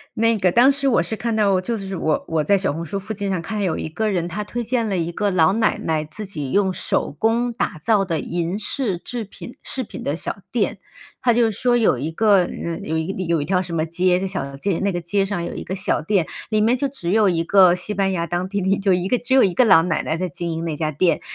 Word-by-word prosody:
那 230 0 +2
个 185 -2 +2
当 245 +7 +6
时 275 0 0
我 240 - +3
是 175 +6 -2
看 230 +1 -2
到 200 -3 +3
就 230 +6 -2
是 195 -3 -5
我 155 -2 0
我 160 -2 0
在 200 - +3
小 195 0 0
红 165 +3 -5
书 195 +5 -4
附 215 +2 -6
近 200 -1 -3
上 180 - -1
看 210 +6 -5
见 205 - 0
有 175 - -1
一 - - -4
个 215 +7 -1
人， 175 -3 -1
他 205 +5 -4
推 240 +3 -4
荐 235 -1 -1
了 195 - -1
一 170 -1 -1
个 205 +3 -1
老 170 0 +4
奶 220 0 +1
奶 155 -1 -1
自 205 +7 -7
己 150 -8 -5
用 195 -1 +2
手 - - -1
工 230 +5 +1
打 205 -7 -3
造 210 -4 +2
的 165 -4 -1
银 175 +6 -3
饰 210 -4 0
制 240 +5 -4
品 235 +5 -11
饰 260 - -1
品 230 - -8
的 145 - -1
小 175 - -3
店。 215 -3 0 0.4
他 245 -2 +3
就 230 -1 +3
说 240 +3 +1
有 220 - +3
一 145 +6 -3
个， 205 +2 +4
呃， 170 -1 -4
有 160 - -3
一 160 +3 -2
个 190 - -3
有 170 -3 0
一 - - -3
条 180 +1 +1
什 175 -2 -6
么 160 -1 0
街 180 +2 +2
的 195 - -2
小 140 -8 -4
街 185 +4 -1
那 200 0 0
个 175 - -2
街 195 +4 0
上 195 -3 -3
有 - - -6
一 - - -5
个 185 - -5
小 190 -5 0
店， 175 +1 +1 0.2
里 215 -1 +2
面 230 +3 +3
就 280 +2 0
只 180 -11 -5
有 210 -1 +4
一 165 -2 0
个 185 -1 +6
西 185 +3 -3
班 195 -1 +1
牙 170 -2 -2
当 175 +2 -2
地 200 0 -2
的 190 - -2
一 195 +1 +3
就 195 -1 +2
一 180 +1 0
个 250 - +2
只 245 +2 -3
有 265 - +6
一 190 - +2
个 255 - +4
老 190 -6 +7
奶 170 -2 -1
奶 160 - -1
在 185 +2 -2
经 170 +2 -4
营 165 0 -3
那 160 - -2
家 155 -1 -1
店。 165 +2 +1
190 Hz, 305 characters per minute, -21 LUFS, 170-215 Hz, 0.4 s, 老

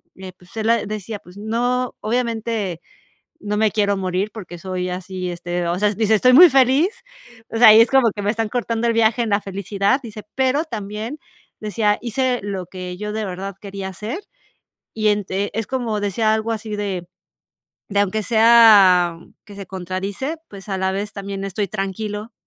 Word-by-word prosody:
eh, 190 -1 -9
pues, 180 +3 -19
él 220 0 0
ah, 230 -1 +2
decía: 215 0 -5
"Pues, 180 0 -17
no, 245 +4 -1
obviamente, 225 -5 -2 0.6
no 210 0 -2
me 215 0 +2
quiero 205 -1 +1
morir, 190 +2 -2
porque 180 -5 -9
soy 185 +1 -4
así, 185 0 -5
este", 175 0 -3
o 170 +1 -1
sea, 210 +1 +2
dice: 220 +1 +2
"Estoy 255 +4 +4
muy 345 +6 +10
feliz". 270 +6 +4 0.6
O 225 - -3
sea, 220 -2 +9
y 220 - +8
es 230 - +4
como 265 -5 +4
que: 205 - -5
"Me 205 +1 +1
están 225 -1 -2
cortando 235 -2 -2
el - - +3
viaje 230 +1 +2
en 225 - -3
la 200 - +3
felicidad", 200 +6 -1
dice, 215 -2 -9
pero 265 +4 +1
también 220 +2 -6 0.4
decía: 210 0 +1
"Hice 250 +1 -1
lo 195 -3 -4
que 180 -1 -7
yo 210 +1 -5
de 220 0 -2
verdad 190 +1 -6
quería 195 -1 -6
hacer". 215 - -6 0.7
Y 215 -1 +1
entre 205 -1 -1
es 225 0 -2
como 235 -5 -2
decía 215 +2 +1
algo 220 +1 -2
así 215 -1 -4
de 190 -4 -4 0.8
de: 200 -1 0
"Aunque 205 +2 0
sea 215 -7 +6 0.3
que 205 -2 -12
se 200 -1 -8
contradice, 190 - -4
pues, 195 -1 -11
a 195 - -1
la 190 0 0
vez 205 +2 -4
también 195 -1 -5
estoy 195 +1 -2
tranquilo 210 +2 -4
210 Hz, 185 wpm, -20 LUFS, 195-230 Hz, 0.8 s, muy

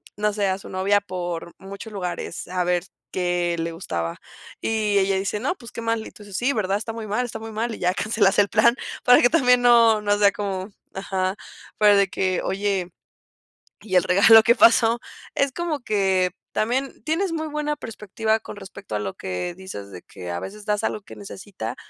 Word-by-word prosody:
no 210 0 0
sé, 205 -1 0
a 190 0 0
su 195 - -11
novia 195 +2 +2
por 175 -3 -5
muchos 200 +3 -9
lugares 180 -4 -5
a 180 0 -1
ver 175 0 0 0.3
qué 175 -1 0
le 165 0 -2
gustaba?". 85 - -4 0.4
Y 215 -2 +1
ella 195 0 +2
dice: 200 +2 -2
"No, 285 +9 -1
pues 235 -8 -13
qué - - -5
mal", 230 -1 -1
y - - -11
tú 210 - -15
dices: 200 -2 -6
"Sí, 260 +3 +1
verdad, 200 -4 0
está 225 +1 -5
muy 225 -1 -6
mal, 215 +5 0
está 225 -2 -6
muy 225 0 -8
mal", 225 +1 -2
y - - -12
ya 180 0 +1
cancelas 210 -1 +2
el 205 - +5
plan, 235 +4 +4 0.3
para 245 0 +7
que - - +6
también 250 -5 +4
no 230 -2 +6
no 205 0 +1
sea 205 -1 +5
como 195 -1 -4 0.3
ajá, 190 -1 -2 0.4
fuera 210 -1 +6
de 200 -1 +4
que: 185 -1 -1
"Oye, 195 -2 -1 0.9
¿y 190 -4 -4
el - - +6
regalo 200 +5 +7
qué 235 +2 +4
pasó?". 230 0 +5 0.4
Es 275 -1 +2
como 330 0 -3
que 190 -5 +1 0.2
también 255 +5 -1
tienes 330 +4 0
muy 315 -1 -2
buena 300 0 -2
perspectiva 220 -3 -2
con 225 - -9
respecto 195 - -8
a - - 0
lo 105 -2 -4
que 95 - -4
dices 135 - -9
de 90 - -9
que 90 -1 -9
a 85 - -3
veces 205 - -8
das 210 -1 0
algo 215 - -1
que 200 - -13
necesita. 190 - -7
205 Hz, 205 wpm, -23 LUFS, 185-225 Hz, 0.9 s, para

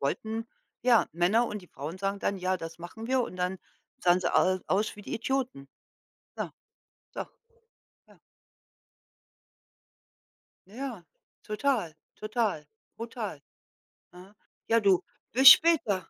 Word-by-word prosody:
wollten 220 - -2 0.4
ja, 240 -2 +4
Männer 190 +8 +2
und 210 -2 -6
die - - -15
Frauen 155 +7 -7
sagen 195 +1 -2
dann: 200 - -1
„Ja, 185 0 0
das 165 -1 -8
machen 195 +7 -8
wir”, 260 0 +2
und 185 - -4
dann 180 +1 -2 0.4
sahen 180 +1 +4
sie - - -1
au 185 0 +3
aus 205 +2 0
wie 205 - -11
die - - -5
Idioten. 240 - -2 0.7
Ja, - - -4 0.6
so. - - -3 0.9
Ja. - - -21 2.5
Na 205 - -15
ja, 245 -9 -6 0.4
total, 215 - -1 0.2
total, 215 - -2 0.3
brutal. 225 - -6 0.7
Aha. 185 +3 -15 0.3
Ja, 230 0 +4
du, 195 -4 +3 0.3
bis 260 +1 +10
später. 235 - +5
200 Hz, 125 wpm, -28 LUFS, 180-230 Hz, 2.5 s, bis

